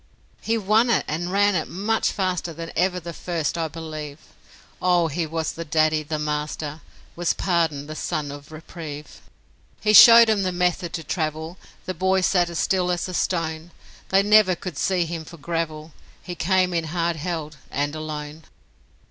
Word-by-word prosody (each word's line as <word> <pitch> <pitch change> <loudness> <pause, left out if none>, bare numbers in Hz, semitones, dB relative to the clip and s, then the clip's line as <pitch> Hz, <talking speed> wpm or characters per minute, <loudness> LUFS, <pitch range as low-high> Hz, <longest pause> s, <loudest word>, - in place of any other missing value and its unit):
He 225 +1 0
won 220 +3 +3
it, 235 - +2
and 175 +4 -3
ran 205 +1 +3
it 165 -4 -1
much 210 +5 0
faster 180 -4 -2
Than 165 +1 -7
even 180 0 0
the 170 0 -6
first, 165 -2 -3
I 165 -1 -1
believe 155 -2 -7 0.6
Oh, 175 -2 +3
he 160 +2 -2
was 160 0 -2
the 165 - -6
daddy, 155 0 +2
the 155 +1 -4
master, 150 0 -3 0.3
Was 175 0 0
Pardon, 165 -6 0
the 155 - -7
son 150 -2 -3
of 145 +1 -11
Reprieve. 155 -2 -9 0.6
He 210 - +2
showed 230 +3 +10
'em 215 -2 +2
the 185 -1 0
method 180 -1 0
to 165 - -4
travel 160 +2 -3 0.3
The 185 - -3
boy 190 +2 +1
sat 180 -1 +2
as 170 - -5
still 180 0 +1
as 175 0 -1
a 185 - -6
stone 165 -2 -2 0.4
They 195 +1 +4
never 210 -3 +5
could 175 -2 -7
see 185 -3 +1
him 165 -1 -5
for 170 - -12
gravel; 160 -1 -4 0.3
He 180 - -6
came 185 +2 +1
in 165 -1 0
hard 170 +1 -1
held, 155 -2 -4
and 145 +1 -2
alone. 155 0 -6
170 Hz, 175 wpm, -23 LUFS, 155-185 Hz, 0.6 s, showed